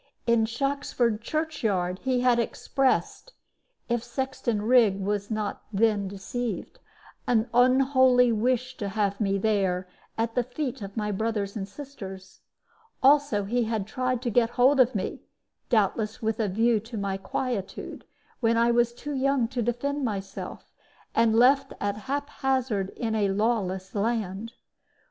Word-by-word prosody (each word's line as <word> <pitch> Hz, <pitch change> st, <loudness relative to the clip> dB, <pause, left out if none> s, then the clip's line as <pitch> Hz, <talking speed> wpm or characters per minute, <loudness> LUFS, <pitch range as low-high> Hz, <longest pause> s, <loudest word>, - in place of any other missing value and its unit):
In 235 Hz, -2 st, +3 dB
Shoxford 240 Hz, -3 st, -1 dB
church 310 Hz, +5 st, -3 dB
yard 185 Hz, -3 st, 0 dB
he 255 Hz, -2 st, 0 dB
had 245 Hz, -1 st, +4 dB
expressed 270 Hz, -, -1 dB, 0.5 s
(if 235 Hz, -1 st, 0 dB
Sexton 240 Hz, -3 st, -2 dB
Rigg 225 Hz, -4 st, +4 dB
was 200 Hz, +1 st, -2 dB
not 215 Hz, -2 st, -3 dB
then 210 Hz, -1 st, +2 dB
deceived) 235 Hz, -, -5 dB, 0.5 s
an 230 Hz, -1 st, +2 dB
unholy 255 Hz, 0 st, +5 dB
wish 250 Hz, +3 st, 0 dB
to 200 Hz, -, -3 dB
have 200 Hz, 0 st, -1 dB
me 200 Hz, -1 st, +1 dB
there, 195 Hz, -3 st, 0 dB, 0.3 s
at 225 Hz, 0 st, -1 dB
the 245 Hz, -, +2 dB
feet 255 Hz, +1 st, -4 dB
of 200 Hz, +1 st, -8 dB
my 210 Hz, -1 st, -1 dB
brothers 205 Hz, 0 st, -2 dB
and 195 Hz, -3 st, -4 dB
sisters. 200 Hz, -7 st, -10 dB, 0.6 s
Also 280 Hz, -6 st, +4 dB
he 235 Hz, +4 st, 0 dB
had 220 Hz, -3 st, -2 dB
tried 255 Hz, +2 st, -2 dB
to 240 Hz, -, -1 dB
get 230 Hz, +1 st, +3 dB
hold 265 Hz, +3 st, +5 dB
of 255 Hz, 0 st, +4 dB
me -, -, -3 dB, 0.5 s
doubtless 215 Hz, 0 st, +1 dB
with 220 Hz, 0 st, -1 dB
a 220 Hz, -, +1 dB
view 225 Hz, +4 st, +2 dB
to 225 Hz, +2 st, -8 dB
my 200 Hz, -1 st, -1 dB
quietude 195 Hz, +1 st, -4 dB, 0.4 s
when 230 Hz, -2 st, +2 dB
I 235 Hz, +1 st, +4 dB
was 235 Hz, 0 st, +2 dB
too 290 Hz, +4 st, -6 dB
young 270 Hz, -2 st, +1 dB
to 250 Hz, -1 st, -2 dB
defend 270 Hz, +5 st, -1 dB
myself, 195 Hz, -4 st, -5 dB, 0.4 s
and 225 Hz, -1 st, +3 dB
left 260 Hz, +4 st, +4 dB
at 205 Hz, 0 st, -1 dB
haphazard 265 Hz, -7 st, -1 dB
in 225 Hz, -3 st, -2 dB
a 210 Hz, -2 st, +1 dB
lawless 195 Hz, -3 st, -1 dB
land. 220 Hz, 0 st, -2 dB
230 Hz, 145 wpm, -26 LUFS, 205-255 Hz, 0.6 s, unholy